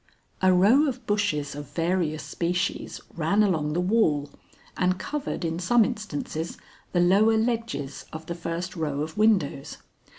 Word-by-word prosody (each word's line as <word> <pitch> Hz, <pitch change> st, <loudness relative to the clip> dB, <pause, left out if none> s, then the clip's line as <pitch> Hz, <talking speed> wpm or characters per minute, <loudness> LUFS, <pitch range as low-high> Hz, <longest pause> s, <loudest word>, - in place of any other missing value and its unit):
A 185 Hz, 0 st, +5 dB
row 215 Hz, +12 st, +5 dB
of 255 Hz, -3 st, -4 dB
bushes 200 Hz, -10 st, 0 dB
of 145 Hz, 0 st, -8 dB
various 165 Hz, -2 st, 0 dB
species 180 Hz, +2 st, -2 dB
ran 185 Hz, +6 st, +2 dB
along 155 Hz, -7 st, +1 dB
the 170 Hz, -, 0 dB
wall 180 Hz, -8 st, +2 dB, 0.4 s
and 185 Hz, 0 st, +1 dB
covered 285 Hz, -, -4 dB
in 165 Hz, +1 st, -2 dB
some 220 Hz, +5 st, +4 dB
instances 175 Hz, -8 st, -4 dB, 0.3 s
the 175 Hz, -, +1 dB
lower 200 Hz, +5 st, +4 dB
ledges 225 Hz, -, -2 dB
of 160 Hz, 0 st, -7 dB
the 170 Hz, -, -4 dB
first 170 Hz, +2 st, -4 dB
row 150 Hz, -4 st, -2 dB
of 155 Hz, +1 st, -4 dB
windows. 205 Hz, -11 st, +1 dB
180 Hz, 145 wpm, -26 LUFS, 160-215 Hz, 0.4 s, A